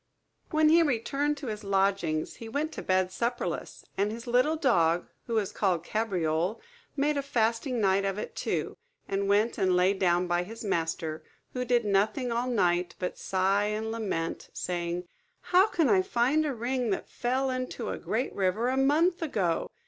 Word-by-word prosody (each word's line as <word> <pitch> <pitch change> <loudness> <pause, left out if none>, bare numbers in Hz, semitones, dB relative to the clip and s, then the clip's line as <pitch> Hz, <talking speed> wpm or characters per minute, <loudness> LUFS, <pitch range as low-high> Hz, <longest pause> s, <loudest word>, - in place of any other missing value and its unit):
When 310 -1 +4
he 335 +2 +6
returned 290 +1 0
to 280 - -7
his 215 -3 -5
lodgings, 195 -5 0
he 230 - -8
went 295 +6 -2
to - - -6
bed 185 0 +1
supperless; 235 +5 -3
and 200 +2 0
his 230 +2 -7
little 250 +6 +3
dog, 175 - +2 0.2
who 230 - -2
was 210 -3 0
called 180 -5 0
Cabriole, 180 -3 -1 0.4
made 295 +1 +1
a - - +1
fasting 240 -1 0
night 195 -1 +3
of 195 0 -1
it 210 - -6
too, - - -2 0.3
and 195 0 -1
went 215 +3 +2
and 185 -2 +3
lay 180 +2 +4
down 180 -2 +2
by 175 0 +1
his 225 +6 -8
master; 165 -4 -2 0.3
who 250 - -2
did 240 -2 +2
nothing 210 +5 +1
all 240 +2 0
night 180 -6 +1
but 180 - -4
sigh 195 +2 +1
and 215 +1 -2
lament, 195 -8 -3
saying, 175 0 -3 0.4
"How 370 +3 +4
can 330 -8 +1
I 385 -2 +4
find 305 -3 +1
a 275 - -2
ring 245 +1 -1
that 195 - -2
fell 260 +2 -1
into 255 0 -4
a - - -4
great 240 +5 -2
river 200 +5 +1
a 260 - 0
month 315 +7 +3
ago? 195 - 0
220 Hz, 180 wpm, -28 LUFS, 185-255 Hz, 0.4 s, he